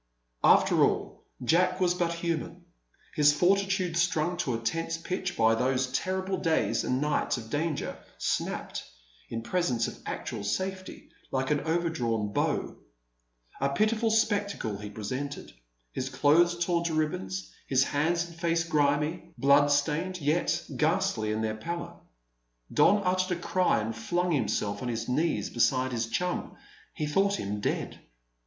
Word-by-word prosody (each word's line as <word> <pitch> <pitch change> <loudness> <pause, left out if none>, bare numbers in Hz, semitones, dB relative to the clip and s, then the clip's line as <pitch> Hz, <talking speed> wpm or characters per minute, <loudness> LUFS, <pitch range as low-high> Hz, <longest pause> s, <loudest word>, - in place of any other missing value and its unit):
After - - +5
all, - - -1 0.2
Jack 180 +7 +3
was 180 -1 +3
but 175 -1 0
human. 170 +1 -3 0.5
His 150 -2 +5
fortitude, 190 +2 +2
strung 175 0 +1
to 130 -9 -1
a - - -1
tense 165 +8 -2
pitch 185 +2 -4
by 115 0 +4
those 125 +2 0
terrible 190 +6 -1
days 165 -3 +1
and 125 - 0
nights 150 -2 0
of 110 -2 -9
danger, 150 0 -1 0.2
snapped, - - -2 0.5
in 115 0 -4
presence 125 -7 0
of - - -8
actual 115 -6 -4
safety, 185 - -4 0.2
like 130 +1 -1
an 150 - +3
overdrawn 125 -11 -1
bow. - - -1 0.8
A 140 - +1
pitiful 215 +9 +1
spectacle 205 - 0
he 105 0 -7
presented, 130 +8 -5 0.4
his 130 - -3
clothes 170 +5 +3
torn 170 -1 +1
to 165 -2 -1
ribbons, 180 +5 -2 0.2
his 135 -1 +4
hands 170 +5 +1
and 170 - -13
face 170 0 +1
grimy, 155 +2 0
bloodstained, 145 +5 +3
yet 155 +3 0
ghastly 110 -1 +1
in 110 +1 -1
their 110 0 0
pallor. 170 +8 -5 0.8
Don 200 +7 +5
uttered 185 -1 +1
a - - -11
cry 180 +1 +2
and 110 +1 -3
flung 175 +10 -1
himself 110 -7 0
on 125 - -3
his 115 -1 -3
knees 155 +7 0
beside 130 -1 +2
his 115 -2 -1
chum. 180 +10 -2 0.4
He 150 - -2
thought 195 +6 +1
him 105 +1 -3
dead. - - -2
160 Hz, 145 wpm, -28 LUFS, 130-180 Hz, 0.8 s, After